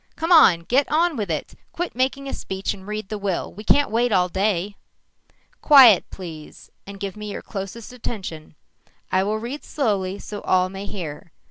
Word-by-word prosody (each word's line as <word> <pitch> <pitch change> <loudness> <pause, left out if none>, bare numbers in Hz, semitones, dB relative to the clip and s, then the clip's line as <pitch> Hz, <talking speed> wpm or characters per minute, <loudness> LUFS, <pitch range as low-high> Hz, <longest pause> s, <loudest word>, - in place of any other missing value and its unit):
"Come 325 +2 -3
on! 245 - +7
Get 260 +11 +1
on 330 +1 +2
with 210 -6 -3
it. 155 -2 -3 0.2
Quit 350 +1 -3
making 265 +2 -1
a - - -5
speech 190 +1 -3
and 190 -1 -13
read 210 -1 -5
the 215 - -4
will, 195 -3 -3
we 210 - -10
can't 285 +3 +3
wait 240 +2 +1
all 180 -2 +3
day!" 195 +1 -1 0.9
"Quiet, 260 - +7
please, 165 -5 -10 0.2
and 200 0 -9
give 200 0 -5
me 210 -1 -6
your - - -6
closest 210 +4 -7
attention. 185 -11 -7 0.6
I 185 - +3
will 210 +3 -1
read 240 +7 -6
slowly 200 - -1
so 205 0 -8
all 185 0 +2
may 195 +1 -7
hear. 165 -4 -7
205 Hz, 180 wpm, -22 LUFS, 185-245 Hz, 0.9 s, on